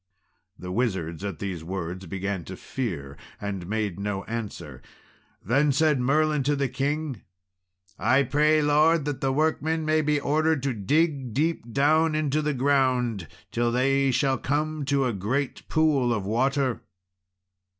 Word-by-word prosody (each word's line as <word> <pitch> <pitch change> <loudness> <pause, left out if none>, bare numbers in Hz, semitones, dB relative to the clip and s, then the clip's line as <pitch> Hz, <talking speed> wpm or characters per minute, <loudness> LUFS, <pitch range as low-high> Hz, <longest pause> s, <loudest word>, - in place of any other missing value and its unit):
The 90 - -7
wizards 95 -7 -2
at 100 -4 -4
these 95 -5 -5
words 90 +1 -5
began 95 0 -3
to 95 - -7
fear, 75 - -5 0.2
and 100 -4 -5
made 105 -2 -2
no 100 -1 -3
answer. 100 - -6 0.6
Then 140 +8 +3
said 150 0 +2
Merlin 150 +3 +2
to 145 +2 +1
the 140 -1 0
king 140 +1 -2 0.8
"I 135 +2 +3
pray, 150 +3 +3
Lord, 150 +1 +3
that 135 -2 -1
workmen 160 +2 0
may 155 0 +2
be 150 -1 +1
ordered 155 0 +1
to 140 -2 0
dig 135 - 0
deep 150 -5 -1
down 155 +4 +3
into 155 -1 0
the 150 -1 -1
ground 125 - +1 0.2
till 120 0 0
they 135 +2 +2
shall 130 +1 +1
come 150 +1 -1
to 140 -1 +1
a 125 - 0
great 125 +8 -2
pool 150 -6 +2
of 105 -4 -1
water." 130 +3 0
135 Hz, 145 wpm, -26 LUFS, 105-150 Hz, 0.8 s, Then